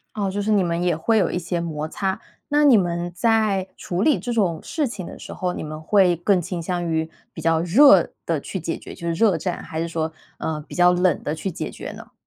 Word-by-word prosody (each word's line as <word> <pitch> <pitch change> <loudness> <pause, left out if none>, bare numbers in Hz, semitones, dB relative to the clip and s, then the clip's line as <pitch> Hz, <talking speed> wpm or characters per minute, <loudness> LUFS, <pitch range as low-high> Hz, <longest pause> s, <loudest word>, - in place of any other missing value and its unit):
哦， 200 -2 -1
就 200 +2 -2
是 215 +2 0
你 205 -2 +4
们 170 0 -1
也 175 -3 +2
会 220 +8 +1
有 200 - +2
一 180 - -1
些 175 0 -2
摩 155 -2 -3
擦。 190 +3 -2 0.3
那 295 +1 +3
你 275 -4 +7
们 175 -3 0
在 210 -2 +2
处 180 +1 -3
理 300 +5 +3
这 245 - -3
种 185 -8 +1
事 310 -3 -2
情 210 -7 -5
的 - - -9
时 - - -10
候， 180 -1 -2
你 - - -5
们 155 0 -6
会 180 -1 +3
更 180 +1 +2
倾 170 +1 -4
向 175 +1 -2
于 160 -1 -1 0.2
比 - - -7
较 165 0 +2
热 195 - +6
地 165 -4 -1
去 190 - -5
解 165 +1 -3
决， - - -10
就 170 - -7
是 170 - 0
热 195 -1 +3
战， 175 +2 -3
还 160 - -5
是 165 - -1
说， 160 -1 -2 0.3
嗯， 155 -1 -3
比 - - -9
较 180 0 +5
冷 180 0 +1
地 150 - -2
去 160 +5 -3
解 165 - -5
决 - - -7
呢？ - - -12
175 Hz, 270 characters per minute, -22 LUFS, 165-200 Hz, 0.3 s, 你